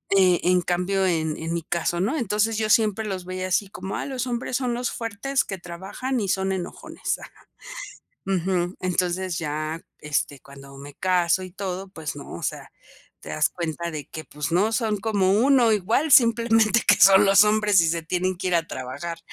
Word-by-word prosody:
Eh, 185 -3 +4
en 180 0 +3
cambio, 180 +2 0
en 160 -3 0
en 165 +1 -4
mi 170 - -2
caso, 175 +1 -1
no. 255 +11 0
Entonces 215 -1 0
yo 215 -1 -1
siempre 215 -1 +2
los 185 -2 -4
veía 185 0 -4
así 190 +2 +1
como, 190 0 -6
ah, - - -3
los 260 -2 -3
hombres 245 +1 -2
son 250 -3 -1
los 245 +1 -2
fuertes 230 +5 -2
que 195 - -5
trabajan 190 +9 -5
y 200 - -2
son 190 0 0
enojones. 185 -2 -4
Ajá. - - -15 0.8
Ujú. 180 -1 0
Entonces 180 -1 -1
ya, 155 +1 -3 0.2
este, 145 -2 -2
cuando 140 0 -14
me 140 0 -11
caso 180 +1 +1
y 185 - -8
todo, 190 0 -5
pues, 160 -6 -6
no, 140 - -9
o 85 - -8
sea, - - -4 0.5
te - - -11
das - - +1
cuenta 170 0 -4
de 150 -3 -6
que, 155 - -8
pues 150 +2 -5
no 205 +6 +2
son 220 -3 0
como 195 -3 +1
uno, 245 +1 +4
igual, 220 - +1
simplemente 230 -2 +5
que 205 - +7
son 195 +1 +7
los 195 +1 +7
hombres 210 -3 +3
y 165 - +2
se 165 0 -1
tienen 180 +2 -1
que 185 0 -3
ir 180 - 0
a 165 - -1
trabajar. 150 +6 -6
185 Hz, 195 wpm, -24 LUFS, 170-215 Hz, 0.8 s, que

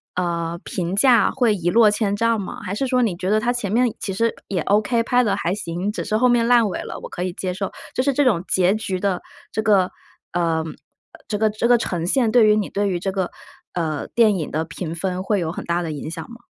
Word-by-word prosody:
呃， 170 -1 -2
评 180 +1 -3
价 240 +1 +5
会 245 -5 +2
一 175 -2 -1
落 225 +2 +6
千 205 -1 0
丈 230 +1 +1
吗？ 195 - -6
还 185 - -4
是 270 +5 -1
说 255 -1 +2
你 215 -7 +1
觉 185 0 -2
得 215 - +3
它 240 - +1
前 230 -5 -3
面 240 0 +2
其 195 - -3
实 230 +4 +1
也 185 -5 -1
OK， 215 +5 +2
拍 245 +2 +3
得 200 -3 +1
还 180 -3 -1
行， 180 +1 -3
只 - - -5
是 215 - -1
后 250 +2 +4
面 235 -1 +3
烂 240 -3 +5
尾 - - -4
了， - - -7
我 - - -8
可 180 - -4
以 180 -1 -3
接 185 0 -3
受？ 195 +1 -4 0.2
就 - - +2
是 280 0 +2
这 290 +2 +3
种 205 -10 +3
结 185 +1 +3
局 190 -4 -3
的 195 -3 0 0.3
这 220 - -1
个， 200 -4 +3 0.4
呃， 165 -2 +1
呃 - - -4 0.6
这 210 - -2
个 215 0 +2
这 215 +2 -1
个 245 - +6
呈 175 -6 -2
现， 235 0 +2
对 240 -3 +6
于 210 - +5
你 210 -3 -1
对 205 0 0
于 180 -3 -1
这 195 +1 -1
个， 190 -2 -1 0.4
呃， 160 -4 -2
电 220 -4 +3
影 155 - -3
的 155 +1 -1
评 165 0 -6
分 185 +1 -2
会 195 -1 0
有 160 - -2
很 - - -7
大 170 +1 0
的 165 -2 -3
影 150 +1 -5
响 165 -1 -6
吗？ 235 - -10
200 Hz, 280 characters per minute, -22 LUFS, 175-230 Hz, 0.6 s, 落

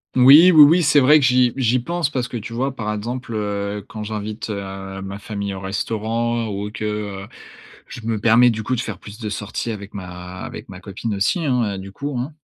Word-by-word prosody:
Oui. 140 +8 +8
Oui, 155 -3 +9
oui, 165 +5 +5
c'est 150 -1 +5
vrai 150 +4 +6
que 140 - +2
j'y 125 -1 +3
j'y 130 -1 +2
pense 170 +4 -2
parce 125 -4 -2
que, 120 - -5
tu 115 +1 -7
vois, 130 +3 -2
par 105 -3 -3
exemple, 120 +3 -5
heu, 100 -1 -3
quand 110 -1 -7
j'invite, 105 +1 -5
heu, 95 -1 -6
ma 95 0 -6
famille 100 -1 -5
au - - -6
restaurant 115 +4 -2
ou 100 +1 -4
que, 110 0 -5
heu, 105 -2 -4 0.6
je 120 - -9
me 115 -2 -1
permets 115 +3 +5
du 110 -1 -4
coup 130 - -1
de 120 - -2
faire - - -6
plus 105 0 -11
de 110 -3 -4
sorties 105 +3 -4
avec 100 -2 -8
ma 90 -1 -8
avec - - -8
ma 95 - -9
copine 105 +2 -4
aussi, 100 - 0
hein, 120 -7 0
heu, - - -6
du 95 +1 -9
coup, 140 +6 -5
hein. 135 +6 -4
110 Hz, 225 wpm, -21 LUFS, 100-125 Hz, 0.6 s, Oui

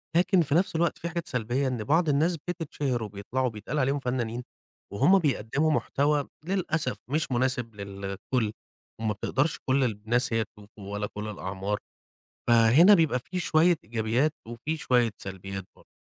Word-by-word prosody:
لكن 180 +1 +4
في 145 -1 0
نَفْس 180 -1 +2
الوقت 170 +1 +1
في 170 - -4
حاجات 170 -1 -4
سلبيّة 125 +2 -1
إن 120 -4 -2
بعض 160 +6 +2
الناس 160 +4 +2
بتتشهر 145 -8 -2
وبيطلعوا 105 +6 -2
وبيتقال 115 +6 -4
عليهم 135 +2 +1
فنّانين 125 -2 -2 0.5
وهُم 190 - +5
بيقدّموا 145 +1 +1
محتوى 145 -1 +1 0.2
للأسف 170 -8 -1
مش 150 0 -1
مناسب 125 -3 0
للكل 100 +3 -3 0.5
وما 110 -1 0
بتقدرش 135 +9 -1
كل 135 +1 +4
الناس 115 +2 +1
إن - - +3
هي 110 - +2
تشوفوا 100 -1 -11
ولا 105 0 -2
كل 105 +1 -5
الأعمار، 100 0 -3 0.7
فهنا 120 - +7
بيبقى 160 -7 +3
في 180 +8 -6
شوية 165 +1 +4
إيجابيّات 115 +6 +1 0.2
وفي 120 +7 -3
شوية 125 -5 +2
سلبيّات 95 0 -6
برضه. - - -21
125 Hz, 155 wpm, -27 LUFS, 110-155 Hz, 0.7 s, فهنا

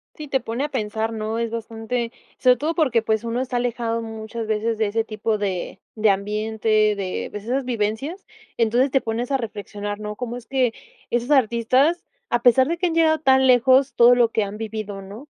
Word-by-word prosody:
Sí, 305 - -8
te 265 -1 +1
pone 235 +4 -3
a - - -2
pensar, 220 -4 -2
¿no? 220 0 -3
Es 230 -1 -1
bastante 230 +1 -3 0.3
sobre 250 -1 +5
todo 310 +6 -2
porque, 260 -9 +2
pues, 220 -1 0
uno 235 +1 -2
está 255 -1 -2
alejado 235 -1 -1
muchas 225 0 -6
veces 220 +1 0
de 220 - +2
ese 220 +2 0
tipo 215 0 -2
de 190 -3 -3
de 215 -1 +3
ambiente, 210 +3 -2 0.3
de, 190 -2 -3
pues, 210 -1 -7
esas 260 +4 -1
vivencias, 245 - -2 0.3
entonces 240 +4 +2
te 270 - +3
pones 230 +2 -3
a - - +4
reflexionar, 205 -3 -5
¿no?, 210 0 -5
cómo 240 +1 -5
es 245 -1 -10
que 255 -2 +1 0.4
esos 240 +3 -1
artistas, 260 +5 +3 0.3
a 240 0 +1
pesar 260 +2 +5
de 340 +1 -1
que 360 - +1
han 335 - -1
llegado 320 -1 +4
tan 265 -3 +4
lejos, 260 +2 +4
todo 240 +1 +7
lo 240 -1 +4
que 220 -2 +1
han 205 +1 -7
vivido, 215 -2 -5
¿no? 205 +8 -10
230 Hz, 205 wpm, -22 LUFS, 220-255 Hz, 0.4 s, todo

